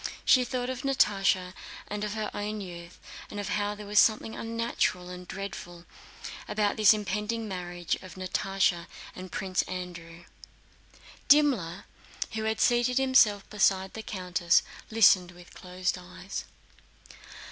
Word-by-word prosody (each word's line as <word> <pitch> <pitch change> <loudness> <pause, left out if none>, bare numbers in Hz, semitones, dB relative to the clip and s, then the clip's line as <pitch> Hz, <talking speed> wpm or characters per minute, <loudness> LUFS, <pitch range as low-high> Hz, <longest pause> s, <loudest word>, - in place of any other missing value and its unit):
She 255 - +6
thought 250 0 -2
of 255 -1 -5
Natásha 195 -8 +2 0.3
and 210 0 -4
of 210 0 -3
her 215 -1 -3
own 210 +1 -3
youth, 175 -3 -9 0.3
and 205 - -6
of 205 - -4
how 205 0 -1
there 210 0 -9
was 205 +1 +3
something 220 0 +3
unnatural 230 -6 -1
and 180 0 -9
dreadful 175 -3 -7 0.6
in 210 -1 +1
this 215 -1 +7
impending 210 +2 -1
marriage 175 -3 -4
of 185 -3 -11
Natásha 185 -1 0 0.3
and 185 -1 -9
Prince 185 -1 0
Andrew. 175 -2 -7 1.0
Dimmler, 255 - +3 0.5
who 220 0 -3
had 220 0 -1
seated 240 +1 +3
himself 245 -7 +4
beside 195 -2 +2
the 220 - -6
countess, 180 -4 +1 0.3
listened 195 -5 +5
with 175 0 -15
closed 185 +1 -3
eyes. 180 +2 -7
195 Hz, 135 wpm, -28 LUFS, 180-220 Hz, 1.0 s, this